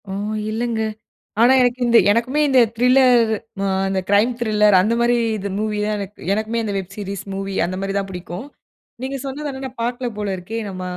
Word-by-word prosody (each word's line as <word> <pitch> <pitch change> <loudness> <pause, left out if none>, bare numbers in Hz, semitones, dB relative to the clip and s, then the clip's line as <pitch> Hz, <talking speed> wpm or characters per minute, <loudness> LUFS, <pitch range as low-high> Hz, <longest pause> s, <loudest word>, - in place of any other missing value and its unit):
ஓ, - - -5 0.4
இல்லைங்க. 225 0 -2 0.6
ஆனா, 240 +3 +6
எனக்கு 245 0 +2
இந்த 235 -1 +6
எனக்குமே 245 +7 +1
இந்த 265 -2 +4 0.2
திரில்லர், 250 -1 +4 0.3
அ, - - 0 0.3
இந்த 190 -1 0
க்ரைம் 210 +5 +4
திரில்லர். 210 -3 +4
அந்த 215 +5 +1
மாரி 240 0 +3 0.2
இது, 200 0 -4
மூவி 215 -1 -2
தான் 210 0 -1
எனக் 200 0 -8
எனக்குமே 220 +2 -1
இந்த 205 -2 -3
வெப் 190 +1 -7
சீரிஸ் 200 -2 -5
மூவி, 195 0 -4
அந்த 185 +1 -4
மாதிரி 195 0 -2
தான் 195 0 -3
புடிக்கும். 180 +5 -7 0.6
நீங்க 270 +1 -3
சொன்னது 290 +2 -4
ஆனா, 265 0 -8
நான் 255 -2 -10
பார்க்கலை 245 +1 -2
போல 210 -1 -2
இருக்கே. 210 +6 -6
நம்ம 185 -1 -7
220 Hz, 190 wpm, -20 LUFS, 200-245 Hz, 0.6 s, ஆனா